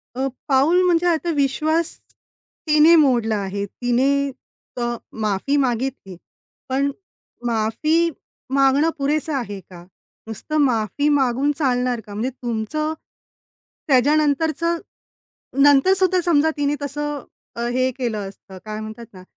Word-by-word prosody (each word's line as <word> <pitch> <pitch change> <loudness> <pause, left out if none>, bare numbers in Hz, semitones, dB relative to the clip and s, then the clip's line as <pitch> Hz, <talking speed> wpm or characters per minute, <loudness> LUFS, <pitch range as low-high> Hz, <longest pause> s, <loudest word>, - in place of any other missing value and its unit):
अ, 265 +1 -1 0.2
पाऊल 295 +6 +4
म्हणजे 350 -1 +2
आता 340 0 +1
विश्वास 310 +4 +1 0.7
तिने 305 +2 +6
मोडला 245 -8 +3
आहे, 200 0 -3
तिने 245 +5 0 0.7
अ, 240 0 -1 0.3
माफी 215 +7 0
मागितली. 250 -7 -2 0.5
पण 275 +2 +1 0.5
माफी 240 +10 +1 0.4
मागणं 275 +3 +4
पुरेसं 300 +2 -1
आहे 205 -7 -3
का? 175 -2 -14 0.4
नुसतं 265 +8 -4
माफी 240 +2 0
मागून 275 0 +2
चालणार 250 -4 0
का? 205 - -10
म्हणजे 220 +5 -2
तुमचं, 255 +5 -3 0.9
त्याच्यानंतरचं 305 +5 +2 0.9
नंतर 290 +6 +6
सुद्धा 370 -1 +2
समजा 320 -2 +3
तिने 290 0 0
तसं 295 0 -4 0.5
हे 255 0 +2
केलं 235 -5 -2
असतं, 190 -1 -14
काय 215 0 -5
म्हणतात 220 +2 -8
ना, 185 -1 -12
270 Hz, 115 wpm, -21 LUFS, 235-305 Hz, 0.9 s, तिने